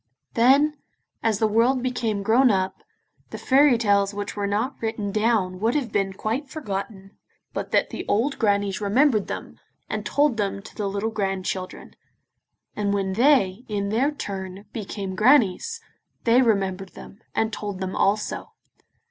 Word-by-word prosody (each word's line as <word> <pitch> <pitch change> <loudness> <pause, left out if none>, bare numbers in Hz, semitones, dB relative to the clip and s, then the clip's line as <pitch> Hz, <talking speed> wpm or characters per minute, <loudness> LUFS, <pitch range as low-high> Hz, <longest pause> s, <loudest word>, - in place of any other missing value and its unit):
Then, 280 +6 +4 0.4
as 225 -3 +1
the 220 +1 +2
world 240 +4 +2
became 230 -5 -1
grown 245 +5 +4
up, 190 -3 0 0.5
the - - -7
fairy 270 -1 +4
tales 200 -3 +2
which 205 -1 -4
were 205 -1 -1
not 225 +7 -1
written 220 -3 -2
down 210 -4 +1
would 225 +6 +1
have 260 -7 -1
been 195 -2 0
quite 230 +9 -3
forgotten 195 -8 -5 0.4
but - - -4
that - - +1
the - - -5
old 245 +7 0
grannies 200 -3 +1
remembered 215 +1 +3
them, - - -7 0.3
and - - -3
told 285 -5 +2
them 200 -1 -2
to - - -13
the 205 -2 -2
little 205 +3 -2
grandchildren: 190 -3 -4 0.8
and 205 -1 0
when 190 -1 -1
they, 230 -3 +3
in 200 -2 -2
their 240 +7 +2
turn, 195 -8 -6
became 200 -3 -5
grannies, 250 - +3 0.4
they 240 +2 +5
remembered 195 -5 0
them, 200 - -12 0.2
and 220 0 0
told 205 -2 -5
them 190 -1 -4
also. 210 +2 0
210 Hz, 155 wpm, -24 LUFS, 195-240 Hz, 0.8 s, they